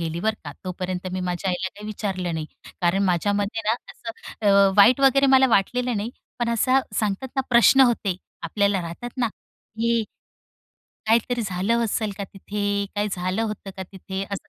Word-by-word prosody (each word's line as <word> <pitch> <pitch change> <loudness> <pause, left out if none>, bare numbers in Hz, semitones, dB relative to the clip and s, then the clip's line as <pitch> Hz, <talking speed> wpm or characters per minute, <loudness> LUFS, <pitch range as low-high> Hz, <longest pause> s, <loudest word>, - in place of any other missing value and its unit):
गेली. 165 0 -3
बरं 220 +1 +1
का, 145 - -6
तोपर्यंत 185 0 -4
मी 185 - -2
माझ्या 180 +1 -2
आईला 185 +1 -2
काही 210 +2 -11
विचारलं 190 -5 -3
नाही. 155 -1 -3 0.3
कारण 180 +2 +2
माझ्यामध्ये 205 +4 0
ना 225 - +4 0.2
असं 230 - -8 0.4
अ, 200 0 +6
वाईट 230 +6 +7
वगैरे 275 0 +5
मला 265 0 +6
वाटलेलं 245 +3 +1
नाही. 210 +3 -3 0.3
पण 240 -1 0
असा 260 +4 +3 0.2
सांगतात 215 +4 -2
ना 265 - +3
प्रश्न 240 +3 +6
होते. 230 -7 +3 0.3
आपल्याला 200 -2 +1
राहतात 170 +9 -6
ना, 235 -2 +2
की 230 +2 -3 1.0
काहीतरी 235 +2 +2
झालं 205 +5 0
असेल 215 -1 -1
का 200 - -3
तिथे? 205 +1 -3
काय 205 0 0
झालं 185 +3 -2
होतं 210 -3 -4
का 190 - -4
तिथे? 190 +1 -6
असं 200 - -6
205 Hz, 170 wpm, -24 LUFS, 185-230 Hz, 1.0 s, वाईट